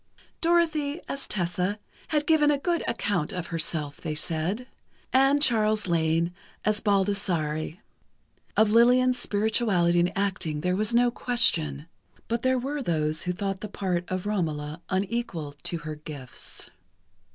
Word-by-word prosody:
Dorothy, 330 -3 +2
as 275 - -5
Tessa, 180 +1 -1 0.3
had 300 -2 0
given 310 -2 +4
a 290 - +3
good 340 +4 0
account 200 -9 -1
of 180 -2 -4
herself, 155 -3 -2
they 155 -2 -3
said, 165 +10 -2 0.5
and 270 +2 +5
Charles 215 -4 +3
Lane, 165 0 +1 0.3
as 215 0 +2
Baldassare. 185 -7 0 0.8
Of 215 -1 +5
Lillian's 250 +2 +5
spirituality 205 -6 +2
and 175 +1 +2
acting 185 -6 -1
there 180 +3 +1
was 215 +3 +1
no 240 +1 +4
question, 160 - +2 0.4
but 235 +1 -1
there 260 +1 +2
were 280 +4 -2
those 155 - 0
who 180 - -1
thought 195 +1 -3
the 210 - -6
part 180 -3 -2
of 185 0 -3
Romola 155 -7 -2
unequal 185 -6 -2
to 170 - -1
her 155 - -3
gifts. 150 -4 -9
195 Hz, 140 wpm, -27 LUFS, 165-240 Hz, 0.8 s, and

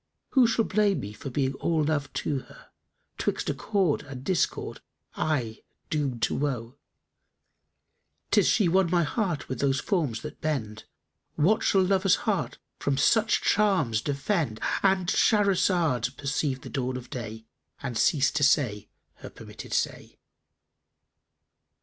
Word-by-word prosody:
Who 260 -4 +5
shall 230 0 +1
blame 205 -1 +1
me 105 +1 -7
for 110 +6 -7
being 135 +1 0
all 160 +3 0
love 145 -1 -1
to 140 - -1
her, - - -16 0.2
* - - -49
'Twixt - - -1
accord 195 -8 0
and 135 -3 -9
discord 185 +3 -1 0.3
aye 125 -8 -2 0.3
doomed 135 -6 -1
to - - +2
woe: 130 -2 -3 1.5
'Tis - - +4
she 205 - +3
won 185 +1 +3
my 175 0 +3
heart 175 -1 -2
with 130 - -5
those 135 -1 +1
forms 150 - -1
that - - -8
bend 115 -9 -3 0.2
* - - -51
What 190 +9 +3
shall 190 -1 +3
lover's 195 0 +3
heart 210 -4 -1 0.2
from 140 -1 0
such 220 - +3
charms 190 - +2
defend?" 145 - -1 0.2
——And 190 -2 +2
Shahrazad 180 - +2
perceived 140 -1 -2
the - - -8
dawn 130 -1 -2
of 125 -1 -10
day 110 -2 -6 0.4
and 125 -4 -4
ceased 135 +5 +2
to 145 - +1
say 125 -7 +2 0.3
her - - -9
permitted - - -11
say. - - -2
145 Hz, 145 wpm, -27 LUFS, 130-190 Hz, 1.5 s, Who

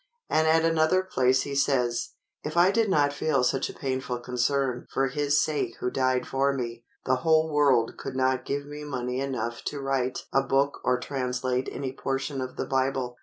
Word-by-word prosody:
And 160 0 +3
at 160 +1 +4
another 165 +3 +3
place 130 -7 +2
he 140 - -5
says, 125 -4 +1 0.3
"If 155 +3 -4
I 180 +2 +6
did 220 0 +2
not 145 -5 +3
feel 145 -3 +1
such 125 +1 +1
a - - -7
painful 130 -2 -3
concern 125 +1 -1
for 135 0 +1
his 145 +2 +1
sake 155 -2 -1
who 125 - -1
died 130 -1 +1
for 135 +1 +1
me, 120 -3 -4 0.2
the 130 0 +2
whole 160 +2 +2
world 135 -6 +3
could 130 - -6
not 130 -1 +1
give 140 +2 -3
me 145 +1 -8
money 125 -3 -3
enough 130 -3 -3
to 145 - -3
write 135 -2 -1
a 135 - +4
book 135 +1 0
or 125 0 +2
translate 125 -1 -2
any 130 -2 -4
portion 135 +1 -3
of 130 +1 -5
the - - -3
Bible. 130 -2 -1
135 Hz, 190 wpm, -27 LUFS, 125-145 Hz, 0.3 s, I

